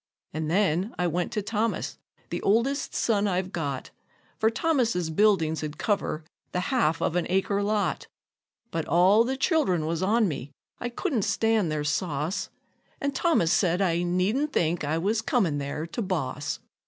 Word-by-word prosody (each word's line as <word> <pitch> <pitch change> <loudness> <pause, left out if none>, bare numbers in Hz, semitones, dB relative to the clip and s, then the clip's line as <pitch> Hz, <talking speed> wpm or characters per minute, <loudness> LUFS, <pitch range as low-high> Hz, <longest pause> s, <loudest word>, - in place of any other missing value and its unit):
An' 155 0 -2
then 185 +3 +1
I 180 - 0
went 175 +1 -1
to 210 - -1
Thomas, 220 +2 -2 0.3
the - - -2
oldest 245 +8 +1
son 210 -3 +2
I've 185 -1 -1
got, 140 -7 -3 0.5
For 220 - +4
Thomas's 230 - +1
buildings 165 -4 +3
'd 150 -1 -5
cover 195 -6 -1 0.3
the 180 - 0
half 225 -11 +2
of 165 - 0
an 180 - +1
acre 195 +2 +1
lot; 205 0 0 0.6
But 165 -1 -2
all 185 +7 +5
the 265 +3 -2
child'rn 265 - +2
was 165 +1 -1
on 215 +3 +3
me 145 -4 -4 0.3
I 245 - -3
couldn't 250 - -1
stand 220 -4 +1
their 150 -1 -1
sauce 150 +2 -1 0.5
And 280 0 -1
Thomas 290 - +2
said 180 -2 +2
I 175 -3 +2
needn't 190 +12 +1
think 170 -7 +1
I 150 +2 0
was 210 +6 0
comin' 190 - +1
there 145 +2 -3
to 170 +8 -4
boss. 155 - -2
185 Hz, 165 wpm, -27 LUFS, 160-225 Hz, 0.6 s, all